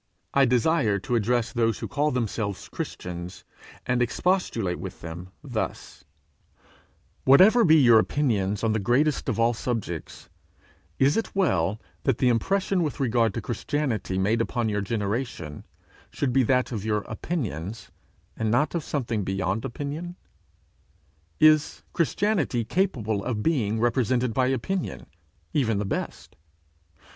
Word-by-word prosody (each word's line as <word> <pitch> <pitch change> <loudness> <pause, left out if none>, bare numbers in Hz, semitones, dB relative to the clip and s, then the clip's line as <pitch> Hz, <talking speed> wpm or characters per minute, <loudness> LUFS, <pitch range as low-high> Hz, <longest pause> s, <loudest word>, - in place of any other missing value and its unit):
I 140 -1 +5
desire 125 -3 +2
to 100 +5 -4
address 120 +1 +1
those 115 -3 +1
who - - -5
call 150 +1 0
themselves 110 -6 -3
Christians, 90 0 -6 0.4
and 125 0 +1
expostulate 120 - 0
with 90 0 -8
them 85 +2 -7
thus: - - -5 1.2
Whatever 195 - +7
be 160 -4 +6
your 120 -7 +7
opinions 105 -7 0
on 110 -1 +2
the 110 - 0
greatest 130 +8 +1
of 115 - -1
all 115 +1 +3
subjects, 110 -9 -4 0.7
is 135 +6 +3
it 225 - -3
well 105 - +1 0.2
that 135 -5 +1
the 125 - +3
impression 190 - +1
with 155 -2 -2
regard 120 -4 +2
to 115 - -2
Christianity 120 -5 -2
made 105 +5 +2
upon 115 -1 -1
your 105 -1 -1
generation, 105 - -3 0.4
should 135 -4 -2
be 135 - +4
that 125 +2 +1
of 110 -5 -3
your 105 -1 0
opinions, 110 - -5 0.4
and 110 -1 -1
not 120 +7 +2
of 170 -3 -2
something 115 -8 -2
beyond 95 +2 -1
opinion? 150 +7 -5 1.2
Is 155 -1 +4
Christianity 170 - 0
capable 115 - 0
of 110 -3 -2
being 115 -9 +1
represented 120 0 +1
by 130 +1 +2
opinion, 150 +9 -2 0.5
even 115 -8 +1
the 105 - -1
best? - - -5
120 Hz, 135 wpm, -26 LUFS, 105-145 Hz, 1.2 s, Whatever